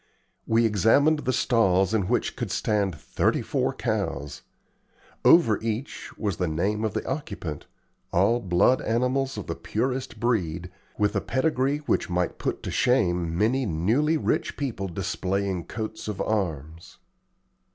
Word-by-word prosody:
We 115 Hz, +1 st, +3 dB
examined 115 Hz, -, +4 dB
the 130 Hz, -, -1 dB
stalls 95 Hz, -6 st, +2 dB
in 100 Hz, -5 st, +1 dB
which -, -, 0 dB
could -, -, -4 dB
stand 100 Hz, -4 st, 0 dB
thirty -, -, 0 dB
four -, -, 0 dB
cows. 70 Hz, +1 st, -3 dB, 0.8 s
Over 140 Hz, -, +6 dB
each 115 Hz, +4 st, -4 dB
was 100 Hz, -6 st, -2 dB
the 90 Hz, -, 0 dB
name 100 Hz, +7 st, -1 dB
of 110 Hz, -2 st, -2 dB
the 110 Hz, -, -3 dB
occupant, 100 Hz, -, -5 dB, 0.4 s
all 100 Hz, +7 st, +3 dB
blood 95 Hz, +5 st, +3 dB
animals 125 Hz, +3 st, 0 dB
of 105 Hz, -, -5 dB
the 85 Hz, -, -3 dB
purest 125 Hz, +4 st, -3 dB
breed, 90 Hz, -7 st, -1 dB, 0.3 s
with 105 Hz, -1 st, +1 dB
a -, -, +1 dB
pedigree 140 Hz, +1 st, 0 dB
which -, -, 0 dB
might 90 Hz, 0 st, -1 dB
put -, -, -3 dB
to -, -, -4 dB
shame 90 Hz, -9 st, +1 dB
many 120 Hz, +5 st, +2 dB
newly 115 Hz, -, +1 dB
rich -, -, -1 dB
people 120 Hz, -9 st, -3 dB
displaying 95 Hz, 0 st, -2 dB
coats 110 Hz, -1 st, -6 dB
of 105 Hz, -3 st, -4 dB
arms. 85 Hz, -6 st, -3 dB
105 Hz, 140 wpm, -26 LUFS, 90-125 Hz, 0.8 s, Over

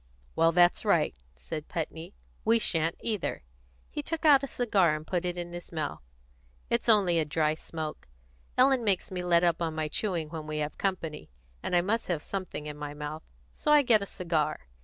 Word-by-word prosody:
"Well, 165 Hz, 0 st, +4 dB
that's 175 Hz, +1 st, +4 dB
right," -, -, +3 dB, 0.2 s
said 65 Hz, -, -6 dB
Putney. 165 Hz, +2 st, -5 dB, 0.3 s
"We 225 Hz, +1 st, +4 dB
sha'n't 165 Hz, -6 st, +1 dB
either." 210 Hz, -, -2 dB, 0.5 s
He 295 Hz, -, -3 dB
took 325 Hz, +2 st, -4 dB
out 285 Hz, -3 st, +7 dB
a 275 Hz, -, -3 dB
cigar 200 Hz, -, +2 dB
and 155 Hz, 0 st, -7 dB
put 180 Hz, 0 st, -1 dB
it 175 Hz, 0 st, -2 dB
into 175 Hz, 0 st, -5 dB
his 175 Hz, 0 st, -8 dB
mouth. 155 Hz, -3 st, -3 dB, 0.7 s
"It's 235 Hz, 0 st, +1 dB
only 190 Hz, -6 st, +5 dB
a -, -, +3 dB
dry 155 Hz, 0 st, +1 dB
smoke. 155 Hz, -1 st, -6 dB, 0.5 s
Ellen 260 Hz, -1 st, +5 dB
makes 195 Hz, -4 st, +1 dB
me 180 Hz, -1 st, -3 dB
let 175 Hz, -1 st, +3 dB
up 170 Hz, -1 st, +2 dB
on 160 Hz, -2 st, -1 dB
my 155 Hz, -1 st, -1 dB
chewing 170 Hz, -2 st, -2 dB
when 155 Hz, -1 st, -6 dB
we 155 Hz, 0 st, -3 dB
have 150 Hz, 0 st, -3 dB
company, 175 Hz, -6 st, -3 dB, 0.3 s
and -, -, -1 dB
I 175 Hz, -, +5 dB
must 220 Hz, +6 st, -1 dB
have 170 Hz, -5 st, -1 dB
something 185 Hz, -6 st, -5 dB
in 150 Hz, -1 st, -6 dB
my 150 Hz, 0 st, -6 dB
mouth, 150 Hz, +1 st, -5 dB, 0.3 s
so 300 Hz, -, -1 dB
I 295 Hz, -1 st, +7 dB
get 225 Hz, -5 st, +4 dB
a 200 Hz, -, -4 dB
cigar. 160 Hz, -5 st, -1 dB
170 Hz, 200 wpm, -29 LUFS, 155-200 Hz, 0.7 s, out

